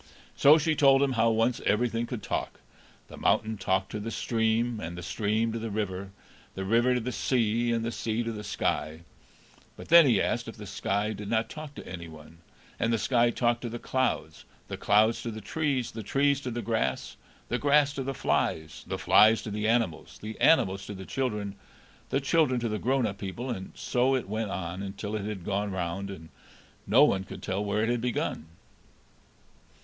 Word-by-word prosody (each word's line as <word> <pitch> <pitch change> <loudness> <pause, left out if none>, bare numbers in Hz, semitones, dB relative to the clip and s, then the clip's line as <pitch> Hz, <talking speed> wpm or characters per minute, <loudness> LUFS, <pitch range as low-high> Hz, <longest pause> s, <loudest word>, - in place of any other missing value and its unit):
So 145 +3 +7
she 160 0 +1
told 140 -2 +5
him 140 - +1
how 115 -2 +3
once 115 +2 +1
everything 115 +2 +1
could 120 -4 -5
talk: - - -3 0.5
the - - -12
mountain 110 0 +1
talked 95 -1 -1
to 105 - -4
the 110 +2 -4
stream, 115 0 0
and 85 -2 -6
the 90 - -7
stream 110 +5 0
to 115 - -3
the 115 0 -4
river, 100 -2 -3 0.5
the 95 - -4
river 120 +5 +3
to - - +1
the 125 +2 -3
sea, 120 -1 +1
and 115 -1 0
the 115 - -2
sea 115 0 -2
to 115 - -3
the 105 -2 -6
sky; 80 -5 -2 0.8
but - - -11
then 170 -2 +8
he 120 - +4
asked 120 -1 -1
if 115 - -8
the 105 - -8
sky 100 +2 -1
did 105 0 -7
not 115 0 0
talk 155 -2 -8
to - - -9
any 85 -2 -7
one; 80 +1 -14 0.4
and 115 - +1
the 115 - +2
sky 120 +2 +2
talked 120 0 0
to 120 - -4
the 120 - -5
clouds, 130 +2 -2 0.3
the - - -3
clouds 110 +2 +3
to 120 - -4
the 110 -1 -6
trees, 135 0 -1
the 110 - -6
trees 140 +6 +1
to 130 - -4
the 120 0 -4
grass, 110 - -1 0.3
the 120 - 0
grass 145 0 +3
to 140 - -4
the 135 +1 -3
flies, 80 -8 -1
the - - -3
flies 110 +1 +5
to 110 - -5
the 105 +1 -1
animals, 115 -8 0
the 110 +1 -7
animals 95 -11 +4
to 105 - -6
the 95 0 -8
children, 105 -6 -2 0.6
the 135 - +1
children 140 -3 +2
to 120 - -2
the 105 0 -2
grown 130 0 +1
up 100 -2 -4
people; 115 +6 -4
and 95 -5 -6
so 125 +2 +1
it 130 - -2
went 110 +1 -2
on, 95 0 -4
until 100 +2 -5
it 105 -2 -3
had 100 -5 -5
gone 100 +1 -1
round, 95 +1 -3
and 80 -5 -9 0.6
no - - +6
one 95 -1 +3
could 95 - -10
tell 95 +2 -2
where 105 +1 0
it 115 - 0
had 120 -1 0
begun. 120 -9 -2
110 Hz, 205 wpm, -28 LUFS, 100-120 Hz, 0.8 s, then